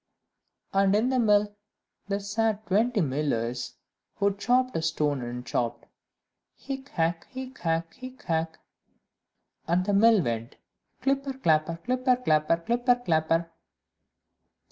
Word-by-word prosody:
And 195 0 +3
in 225 +4 +2
the 260 -1 +1
mill 210 -2 +3 0.5
there 200 0 -1
sat 215 +1 -1
twenty 220 +3 +2
millers, 130 -5 -2 0.4
who 200 -1 +1
chopped 250 +4 +1
a - - 0
stone, 150 -4 0
and 120 +1 -6
chopped, 115 0 -2 0.7
"Hick, 270 0 -7
hack, 165 0 -1
hick, 260 0 -8
hack, 165 0 -1
hick, 255 +1 -11
hack;" 160 -1 -1 1.1
and 175 +3 +1
the 205 - 0
mill 220 +2 +6
went, 115 0 -3 0.5
"Clipper, 275 0 0
clapper, 165 -8 +1
clipper, 255 +1 +2
clapper, 155 -9 +2
clipper, 240 +7 +2
clapper." 165 -6 0
200 Hz, 120 wpm, -27 LUFS, 160-245 Hz, 1.1 s, mill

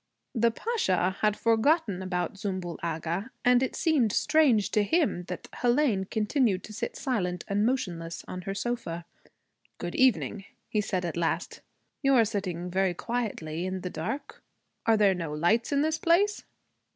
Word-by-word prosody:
The 235 -1 +3
Pasha 225 - 0
had 210 -1 +3
forgotten 230 - +2
about 180 -2 -2
Zümbül 185 -4 -4
Agha; 170 +4 -2 0.2
and 245 0 +5
it 265 - -1
seemed 295 - +2
strange 270 -6 +3
to 210 - +3
him 205 - +1
that - - -6
Hélène 240 -6 +1
continued 215 -3 +1
to 215 - -9
sit 235 +2 -4
silent 180 - -2
and 205 +2 +2
motionless 170 -10 -3
on 185 - -5
her 195 +1 -4
sofa. 200 -7 -3 0.7
'Good 175 0 -5
evening,' 225 -5 +2 0.2
he 210 - 0
said 185 -3 -2
at 170 -1 -3
last. 170 -1 -1 0.4
'You 275 -1 +4
are 230 -3 +6
sitting 185 -5 -3
very 190 -1 +1
quietly 205 -9 -3
here 180 - -1
in 185 0 -3
the 180 - -4
dark. 180 - -5 0.5
Are 225 -1 +5
there 205 -2 +5
no 165 -4 -4
lights 175 - +2
in 285 0 +3
this 315 0 0
place?' 380 +5 +2
205 Hz, 165 wpm, -28 LUFS, 180-245 Hz, 0.7 s, are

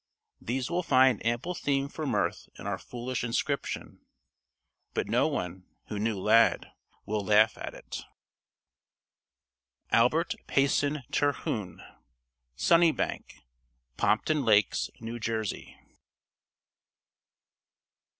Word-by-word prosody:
These 125 +4 -2
will 175 +1 +1
find 130 - +4
ample 120 +10 -1
theme 140 -4 0
for 155 +1 -5
mirth 105 -6 -1
in - - -10
our 100 -2 -2
foolish 125 0 -5
inscription. 115 -1 -3 0.9
But - - 0
no - - +2
one, 90 +1 -4 0.2
who 105 - -3
knew 110 -1 -1
Lad, 115 +4 +3 0.3
will 105 0 -2
laugh 105 +2 +4
at - - -7
it. - - -7 1.9
ALBERT 150 +9 +3
PAYSON 140 +1 +1
TERHUNE. 110 -9 -1 0.7
"Sunnybank" 165 - +1 0.5
Pompton 145 +7 +2
Lakes, 105 -3 +3
New 115 +1 -6
Jersey. 110 -2 -3
120 Hz, 95 wpm, -29 LUFS, 105-140 Hz, 1.9 s, find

